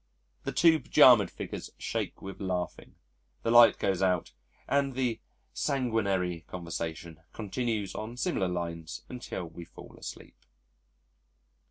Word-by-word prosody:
'" - - -42
The - - -1
two 165 -1 +5
pyjamaed 120 -13 +6
figures - - -6
shake - - -4
with 95 +1 -8
laughing, 90 -2 -3 0.5
the 115 - +1
light 120 -1 +8
goes 95 -1 0
out 90 -8 +1 0.3
and 140 -2 +1
the 125 -4 0 0.3
sanguinary 100 - 0
conversation 85 -2 -5
continues 110 -1 -2
on 110 +3 -6
similar 125 - 0
lines 85 -2 -4
until 125 -7 -5
we 85 +1 -9
fall - - -13
asleep. - - -10
100 Hz, 125 wpm, -29 LUFS, 90-120 Hz, 0.5 s, light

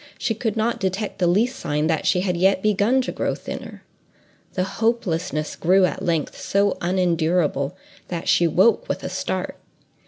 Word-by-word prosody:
she 240 - -1
could 225 -1 -3
not 225 +2 0
detect 195 +2 -2
the 180 - +3
least 225 +9 +1
sign 150 +1 -1
that 160 -1 0
she 180 - +3
had 180 -2 0
yet 190 +2 +2
begun 215 +5 +3
to - - -3
grow - - -2
thinner. - - -8 0.7
The 185 - +1
hopelessness 190 -6 -1
grew 185 +2 +4
at - - -3
length 165 -4 -1
so 200 0 +1
unendurable 170 -5 +1 0.3
that 170 -2 -5
she 170 - +4
woke 230 - +3
with - - -2
a - - -3
start. - - -3
185 Hz, 165 wpm, -22 LUFS, 170-215 Hz, 0.7 s, grew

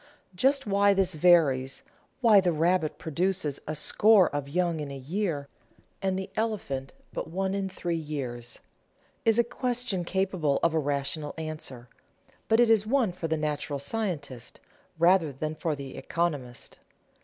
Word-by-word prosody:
Just 270 +9 +2
why 200 0 +3
this 190 -1 +2
varies, 150 -6 +3 0.4
why 220 -5 +7
the 180 -2 +2
rabbit 165 0 +1
produces 165 -2 -1
a 155 - -2
score 200 +5 +5
of 145 -1 -3
young 170 0 0
in 145 -2 -4
a 140 - -6
year, 150 0 -2 0.5
and 190 -1 0
the 190 0 -5
elephant 200 -12 -2 0.2
but - - -4
one 190 +3 -1
in 195 -1 -2
three 170 -2 -3
years, 130 -6 -4 0.6
is 225 -1 +4
a 235 - +5
question 245 -5 -2
capable 185 -6 0
of 170 - +3
a 160 - +2
rational 145 +1 -2
answer, 155 -6 -6 0.6
but 225 - +3
it 240 -2 +5
is 215 -1 +3
one 245 -5 +2
for 175 -2 -4
the 160 0 0
natural 150 -1 -2
scientist 145 - -4 0.4
rather 170 -1 +4
than 155 +3 -4
for 155 0 -2
the 140 -2 -8
economist. 145 -8 -3
170 Hz, 155 wpm, -28 LUFS, 145-195 Hz, 0.6 s, why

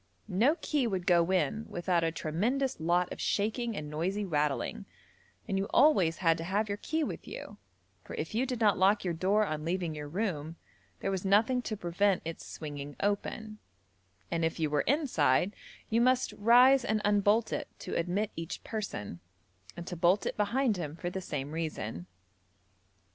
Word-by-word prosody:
No 220 - +3
key 285 -5 +1
would 190 -5 -2
go 170 -1 +4
in 215 +4 0
without 175 -1 0
a 165 - +1
tremendous 220 - -1
lot 175 +2 +1
of - - -8
shaking 225 +2 -1
and 150 - -4
noisy 180 +7 -2
rattling, 150 - -1 0.6
and 195 - 0
you 195 - 0
always 195 - +4
had 165 -2 +2
to - - -3
have 200 +5 0
your 200 0 -3
key 320 +6 -1
with - - -5
you, - - -8 0.5
for - - -8
if - - -4
you 245 +4 +1
did 250 -2 -3
not 210 -5 +3
lock 200 +3 +4
your 175 -2 -1
door 195 +6 +2
on 155 -4 -3
leaving 170 0 -1
your 150 -1 -6
room 165 -3 -3 0.5
there 195 - -1
was 190 -2 -2
nothing 220 +6 +3
to 215 -3 -4
prevent 185 +2 +1
its 165 0 -5
swinging 145 -2 -7
open; 215 +1 -2 0.7
and 170 -1 0
if 160 0 -1
you 155 -2 0
were 150 - +2
inside 205 - +2 0.4
you 230 +1 +3
must 255 +1 +2
rise 250 +5 +6
and 220 -2 +1
unbolt 205 +2 +3
it - - -3
to - - -6
admit 185 +5 0
each 165 0 -6
person, 150 - -5 0.6
and 175 - -6
to 180 - -5
bolt 175 +4 +3
it - - -2
behind 220 +2 +1
him 155 -3 -4
for 175 +1 -4
the 190 - -4
same 145 -5 -4
reason. 115 - -4
190 Hz, 180 wpm, -30 LUFS, 165-220 Hz, 0.7 s, rise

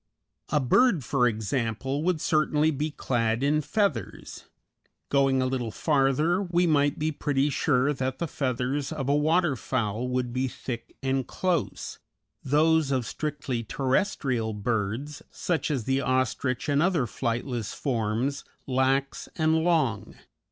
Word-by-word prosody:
A 150 - +2
bird, 155 - +3
for 125 -3 +2
example, 115 +5 -2
would 175 0 +1
certainly 155 0 +2
be 150 +2 -2
clad 120 -4 -1
in 150 +2 +2
feathers. 180 - -2 0.6
Going 135 -2 +3
a - - 0
little 130 -3 -1
farther, 150 - +2
we 175 -2 +1
might 145 -3 +2
be 155 +1 0
pretty 145 -1 0
sure 140 0 +2
that 130 -1 -3
the 170 - -2
feathers 135 +1 -2
of 145 -4 -3
a 140 - +3
water 155 +1 +2
fowl 120 -1 -2
would 125 -1 -2
be 130 +1 0
thick 120 -2 -7
and 135 -1 0
close; 180 -6 -2 0.4
those 155 +1 +3
of 130 -3 0
strictly 140 -5 -3
terrestrial 130 - 0
birds, 115 +7 -2
such 170 -3 -2
as 135 -6 -1
the 135 +3 +1
ostrich 130 0 0
and 145 0 +2
other 170 -6 +2
flightless 120 -1 -3
forms, 120 +1 -1 0.2
lax 135 +1 0
and 160 0 +2
long. 155 - +1
135 Hz, 135 wpm, -27 LUFS, 125-150 Hz, 0.6 s, bird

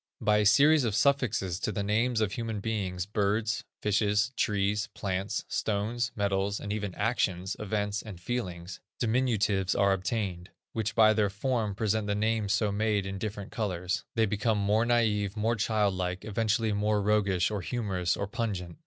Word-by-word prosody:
By 105 0 +3
a 105 - +2
series 145 +7 +6
of 110 -4 0
suffixes 110 -8 +1
to 110 - -1
the 100 -2 -2
names 110 +3 +1
of 105 -3 +1
human 115 -2 -3
beings, 95 -4 -2
birds, 105 +2 0 0.2
fishes, 105 +2 +2
trees, 105 -1 0
plants, 95 0 -2
stones, 115 +3 -1
metals, 100 0 0
and 100 - -4
even 100 -3 -4
actions, 95 -4 0
events, 105 -1 -2
and 100 -6 -9
feelings, 90 -4 -4 0.2
diminutives 110 -6 +1
are 100 -1 +4
obtained, 95 -2 -3 0.2
which 110 -1 -2
by 110 -1 +6
their 105 -2 +2
form, 110 0 -1
present 110 0 0
the 105 - 0
names 110 -1 0
so 105 -1 +2
made 105 -1 0
in 95 0 -5
different 105 -1 -5
colors; 90 -4 -2
they 115 -1 +3
become 110 +1 0
more 105 +3 +2
naïve, 110 -4 +1
more 115 +2 +1
childlike, 95 -4 0
eventually 110 +1 0
more 105 +1 +1
roguish, 100 -3 +2
or 105 -2 -2
humorous, 90 -5 -1
or 100 - -1
pungent. 100 - -4
105 Hz, 160 wpm, -29 LUFS, 100-110 Hz, 0.2 s, series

